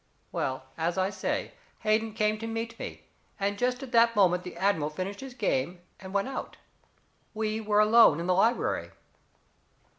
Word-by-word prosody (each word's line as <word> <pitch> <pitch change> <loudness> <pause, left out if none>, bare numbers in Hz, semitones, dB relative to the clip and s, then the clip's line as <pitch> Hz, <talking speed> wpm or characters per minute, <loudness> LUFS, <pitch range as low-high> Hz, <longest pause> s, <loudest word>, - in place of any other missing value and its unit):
Well, 130 0 -2 0.2
as 170 +2 0
I 190 +1 +1
say, 205 - -2 0.3
Hayden 215 +1 +1
came 215 0 +1
to 225 - -5
meet 225 +1 -4
me, - - -7 0.4
and 200 +1 0
just 250 +2 0
at 260 - -8
that 230 -1 +5
moment 180 -3 +4
the 180 -1 -9
admiral 175 -5 +1
finished 185 +6 -5
his 265 -2 -8
game 175 - -1 0.2
and 190 0 -9
went 200 +2 0
out. 270 - -6 0.8
We 215 0 -1
were 210 -1 +2
alone 215 -7 +6
in 170 - -3
the 180 - +2
library. 225 +6 +1
210 Hz, 170 wpm, -28 LUFS, 185-225 Hz, 0.8 s, alone